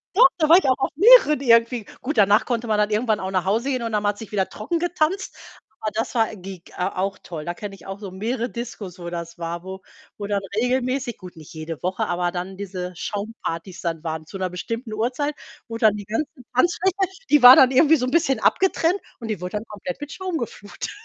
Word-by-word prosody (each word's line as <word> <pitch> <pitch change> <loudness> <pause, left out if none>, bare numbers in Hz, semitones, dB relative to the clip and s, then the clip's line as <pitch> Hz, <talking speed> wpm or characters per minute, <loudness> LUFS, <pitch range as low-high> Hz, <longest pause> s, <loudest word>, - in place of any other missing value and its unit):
Doch, 435 -2 +8
da 315 -3 +2
war 335 +3 +8
ich 380 - +1
auch 260 -1 +3
auf 270 - -1
mehreren 390 - +7
irgendwie. 230 -2 +3 0.2
Gut, 260 -3 -1
danach 205 +1 +5
konnte 240 -1 -2
man 215 -1 +1
dann 210 0 +1
irgendwann 215 0 +1
auch 190 0 -4
nach 185 -2 0
Hause 225 +7 0
gehen 255 -2 -1
und 230 - -2
oder 215 -1 0
man 205 - +1
hat 205 - -15
sich 225 - -9
wieder 195 -3 0
trocken 220 +11 -3
getanzt. 350 +2 -1 0.5
Aber 215 - -1
das 225 - -2
war 225 -2 +1
gig 185 -2 -10
a 180 +1 -2
auch 195 +1 -1
toll. 155 -3 -7
Da 175 - -3
kenne 205 +1 -7
ich 195 - -15
auch 195 0 -5
so 200 -3 -7
mehrere 230 +6 -2
Discos, 215 -6 -7
wo 175 -1 -6
das 170 0 -7
war, 170 +1 -4
wo 190 0 -8 0.4
wo 205 - -4
dann 200 -1 0
regelmäßig 250 +1 0
gut, 180 -2 -12
nicht 155 -2 -13
jede 160 0 -7
Woche, 185 +1 -1
aber 175 0 -1
dann 180 +2 -5
diese 185 -2 -5
Schaumpartys 200 -3 -5
dann 165 -2 -3
waren, 160 -1 -4
zu 195 - -7
'ner 185 -1 -2
bestimmten 230 +5 -5
Uhrzeit, 250 +7 -1 0.3
wo 230 -1 -5
dann 215 -3 +4
die 205 -1 -7
ganze 225 +9 -2 0.3
Tanzfläche 350 +7 +2 0.4
die 295 -2 +6
war 250 +1 +12
dann 260 -1 +6
irgendwie 305 +4 +5
so 250 - -1
'n 255 - -3
bisschen 285 -4 +2
abgetrennt, 370 -1 +2 0.2
und 230 - -6
die 210 -5 -3
wurde 180 +3 -3
dann 210 - -6
komplett 245 +7 -7
mit 290 -1 -7
Schaum 370 -1 -3
geflutet. 205 -5 -6
215 Hz, 235 wpm, -23 LUFS, 185-260 Hz, 0.5 s, war